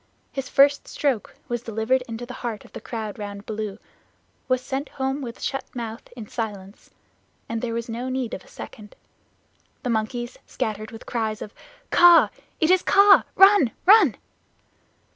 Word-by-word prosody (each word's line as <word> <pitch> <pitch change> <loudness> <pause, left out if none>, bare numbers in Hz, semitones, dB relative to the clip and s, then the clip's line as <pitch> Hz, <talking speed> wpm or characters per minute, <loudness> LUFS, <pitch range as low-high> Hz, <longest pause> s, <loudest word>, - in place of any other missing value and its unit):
His 270 -1 -5
first 280 +1 +4
stroke 270 -7 -1
was 240 -1 -2
delivered 225 +3 0
into 230 +1 -6
the 250 - -8
heart 230 -4 -4
of - - -18
the - - -8
crowd 220 -3 -6
round 205 0 -7
Baloo. 215 -2 -4
It 205 - -17 0.7
was 255 -1 +2
sent 270 +2 -4
home 270 +1 -2
with 240 -3 -7
shut 270 - -2
mouth 230 -2 -5
in 225 -4 -8
silence, 205 -3 -6 0.6
and 230 0 -3
there 230 -2 -3
was 235 0 -3
no 240 +2 -4
need 255 -3 -2
of 190 - -6
a - - -21
second. 210 -2 -11 0.9
The 245 - -1
monkeys 240 +2 -3
scattered 215 0 -3
with 225 -2 -11
cries 220 -3 -2
of 210 - -8 0.4
"Kaa! 350 -1 +7 0.3
It 320 +2 +3
is 370 -1 +5
Kaa! 400 0 +6
Run! 385 - +6
Run!" 385 - +7
240 Hz, 165 wpm, -24 LUFS, 220-270 Hz, 0.9 s, Kaa